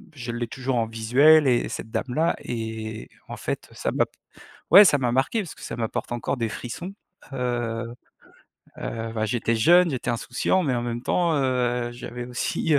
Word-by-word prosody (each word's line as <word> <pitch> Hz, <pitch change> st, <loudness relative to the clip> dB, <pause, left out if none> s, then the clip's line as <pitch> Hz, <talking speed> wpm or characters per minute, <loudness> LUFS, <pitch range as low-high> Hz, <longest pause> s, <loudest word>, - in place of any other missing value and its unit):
je 120 Hz, -3 st, -5 dB
l'ai 120 Hz, 0 st, -3 dB
toujours 130 Hz, 0 st, -2 dB
en 115 Hz, -, +2 dB
visuel, 135 Hz, +8 st, +5 dB
et 120 Hz, -2 st, +2 dB
cette 110 Hz, -, -6 dB
dame-là 155 Hz, +6 st, 0 dB
et 110 Hz, -2 st, -5 dB, 0.2 s
en -, -, -5 dB
fait, -, -, -4 dB
ça -, -, -2 dB
m'a -, -, +2 dB, 0.7 s
ouais, 200 Hz, +4 st, +11 dB
ça 145 Hz, -, +5 dB
m'a 125 Hz, -2 st, 0 dB
marqué 135 Hz, -, +1 dB
parce 175 Hz, -, -9 dB
que -, -, -16 dB
ça -, -, -5 dB
m'apporte 115 Hz, +1 st, -3 dB
encore 120 Hz, +2 st, -2 dB
des 115 Hz, -2 st, -1 dB
frissons, 170 Hz, -, -6 dB, 0.4 s
heu. 120 Hz, -2 st, -2 dB, 0.9 s
Heu, 115 Hz, 0 st, -4 dB
bah, 110 Hz, 0 st, 0 dB
j'étais 115 Hz, +1 st, 0 dB
jeune, 175 Hz, +8 st, +5 dB
j'étais 125 Hz, -2 st, -2 dB
insouciant, 125 Hz, +10 st, 0 dB
mais 130 Hz, -3 st, +1 dB
en 120 Hz, -, -1 dB
même 120 Hz, 0 st, -4 dB
temps, 170 Hz, +1 st, +1 dB
heu, 125 Hz, -2 st, 0 dB
j'avais 120 Hz, 0 st, -7 dB
aussi, 125 Hz, +5 st, -1 dB
heu -, -, +6 dB
120 Hz, 185 wpm, -24 LUFS, 115-135 Hz, 0.9 s, ouais